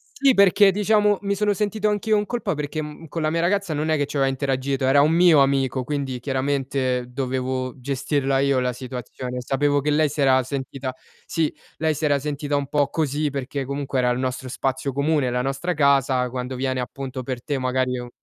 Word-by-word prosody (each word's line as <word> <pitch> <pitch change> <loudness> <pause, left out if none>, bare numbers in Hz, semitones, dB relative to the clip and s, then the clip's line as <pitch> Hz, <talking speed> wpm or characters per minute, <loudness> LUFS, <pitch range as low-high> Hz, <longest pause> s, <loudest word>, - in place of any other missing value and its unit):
Sì 270 -1 +4
perché, 200 -1 +6
diciamo, 210 +1 +3
mi 200 0 -1
sono 210 0 +1
sentito 210 +1 0
anch'io 210 +1 +1
in 205 - 0
colpa, 225 -5 -2
perché 150 +1 -3 0.3
con 165 +2 -4
la 155 - +1
mia 165 +1 0
ragazza 190 0 0
non 155 +2 -1
è 155 - +3
che 145 -1 0
ci 145 - -8
aveva 135 -1 +2
interagito, 135 0 -1
era 140 +2 +5
un 150 +2 +4
mio 170 -3 +6
amico 135 -2 +1
quindi 135 -2 -3
chiaramente, 130 -1 -1
dovevo 130 0 -3
gestirla 135 +1 0
io 140 -1 +2
la 125 0 0
situazione. 125 0 -6
Sapevo 145 +3 +1
che 150 +2 0
lei 150 0 +3
si 145 - -3
era 130 -1 +5
sentita 130 0 -5 0.3
sì, 160 -3 -1 0.2
lei 160 0 +1
si 155 +1 -3
era 145 -1 +3
sentita 145 0 -3
un 140 -1 -1
po' 145 0 +1
così, 150 -1 -1
perché 140 0 -4
comunque 140 0 -2
era 125 -1 +2
il 125 - 0
nostro 130 0 -3
spazio 135 +2 -2
comune, 140 0 +1
la 125 0 0
nostra 135 +7 -2
casa 135 -3 +3
quando 125 +1 -4
viene, 130 0 -1
appunto, 130 +1 -5
per 125 -1 -5
te 145 -2 -2
magari 130 0 0
è - - -4
u 125 0 -7
140 Hz, 205 wpm, -23 LUFS, 130-155 Hz, 0.3 s, perché